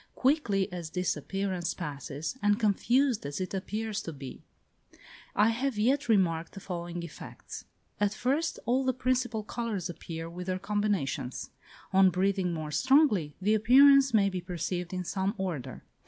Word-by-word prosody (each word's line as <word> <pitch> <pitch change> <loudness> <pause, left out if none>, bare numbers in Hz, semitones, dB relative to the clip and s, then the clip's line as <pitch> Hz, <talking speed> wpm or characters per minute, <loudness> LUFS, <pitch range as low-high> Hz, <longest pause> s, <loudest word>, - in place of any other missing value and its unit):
Quickly 250 -9 +2
as 170 -3 -5
this 180 +2 -1
appearance 195 -3 -3
passes, 145 - -5
and 205 +1 +3
confused 240 +4 +2
as 140 0 -4
it 185 0 -4
appears 215 +2 -3
to 165 - -6
be, 135 -3 -9 0.9
I 210 +2 +5
have 245 +1 -1
yet 255 +5 +1
remarked 170 -6 +2
the - - -8
following 175 -2 -5
effects: 170 - -9 0.3
At 205 -1 +2
first 285 +8 0
all 255 +3 +2
the 260 -2 0
principal 250 -3 0
colours 210 -6 -3
appear 165 -1 -7
with 180 +2 -7
their 185 0 0
combinations; 190 -10 -2 0.4
on 190 0 +6
breathing 185 0 +1
more 155 -2 -4
strongly, 210 - +3
the 205 +3 +2
appearance 270 +5 +6
may 210 -3 +4
be 185 -2 -3
perceived 175 0 -3
in 185 -1 -3
some 195 +3 -1
order. 175 -9 -4
195 Hz, 155 wpm, -29 LUFS, 175-230 Hz, 0.9 s, on